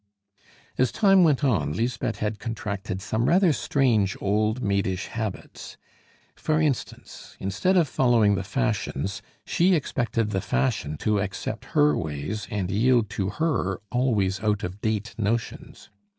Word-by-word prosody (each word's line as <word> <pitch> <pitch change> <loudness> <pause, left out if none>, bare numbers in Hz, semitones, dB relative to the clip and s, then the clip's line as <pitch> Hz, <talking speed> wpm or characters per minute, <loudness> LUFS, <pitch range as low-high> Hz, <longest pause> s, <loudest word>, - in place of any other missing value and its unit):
As 130 -1 +3
time 195 -3 +5
went 150 -3 +3
on, 90 - +1
Lisbeth 120 +3 -2
had 105 0 -3
contracted 100 -4 -4
some 110 +2 -1
rather 180 -2 +4
strange 115 -11 +1
old 105 +4 0
maidish 100 -2 0
habits. 110 -4 -6 0.6
For 155 0 0
instance, 150 -6 -3
instead 110 - +1
of 170 -4 +4
following 120 -6 +3
the 100 - 0
fashions, 95 +6 -2 0.2
she 180 +2 +3
expected 115 -7 -1
the 95 -1 -1
fashion 70 +3 -1
to 105 -1 +2
accept 100 +3 -4
her 150 0 +5
ways 80 +7 -4
and 100 -3 -2
yield 115 +1 +2
to 95 -1 -2
her 105 - -1
always 110 -7 +1
out 105 -2 0
of 90 +3 -5
date 110 0 -2
notions. 115 +2 -3
110 Hz, 135 wpm, -25 LUFS, 100-130 Hz, 0.6 s, time